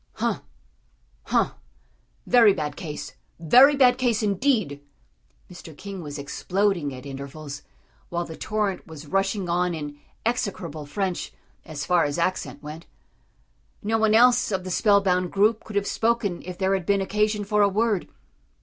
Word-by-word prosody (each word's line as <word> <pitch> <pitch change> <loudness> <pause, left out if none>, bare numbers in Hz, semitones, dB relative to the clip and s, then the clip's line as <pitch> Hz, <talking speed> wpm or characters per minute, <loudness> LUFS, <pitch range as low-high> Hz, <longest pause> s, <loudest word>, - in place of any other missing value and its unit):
"Hum - - -1 0.8
hum - - +2 0.7
very 230 -5 +6
bad 150 -4 -3
case; 155 -6 -7 0.3
very 255 - +7
bad 255 -2 +4
case, 235 -4 +1
indeed!" 205 - +1 0.7
Mr. 165 -4 -12
King 195 -2 -7
was 145 -2 -7
exploding 175 +2 -1
at 130 +1 -9
intervals, 140 +1 -7 0.5
while 175 0 -2
the 160 - -8
torrent 210 -2 -2
was 160 -2 -10
rushing 195 +3 0
on 175 0 0
in 145 -2 -7 0.3
execrable 180 -10 -2
French 185 +3 -3 0.3
as 155 -3 -5
far 175 -2 +3
as 145 -1 -1
accent 170 -3 -2
went. 155 +3 -9 1.0
No 225 +2 +1
one 220 0 +3
else 240 -1 +5
of 190 -2 -1
the 185 - -5
spellbound 185 -3 +3
group 215 +3 +2
could 215 - -10
have 200 0 +1
spoken 225 -6 0
if 180 -1 -7
there 190 0 +1
had 190 -3 -2
been 200 -1 +3
occasion 210 +2 0
for 210 +1 +1
a 200 - +5
word. 210 -1 0
190 Hz, 150 wpm, -25 LUFS, 160-210 Hz, 1.0 s, very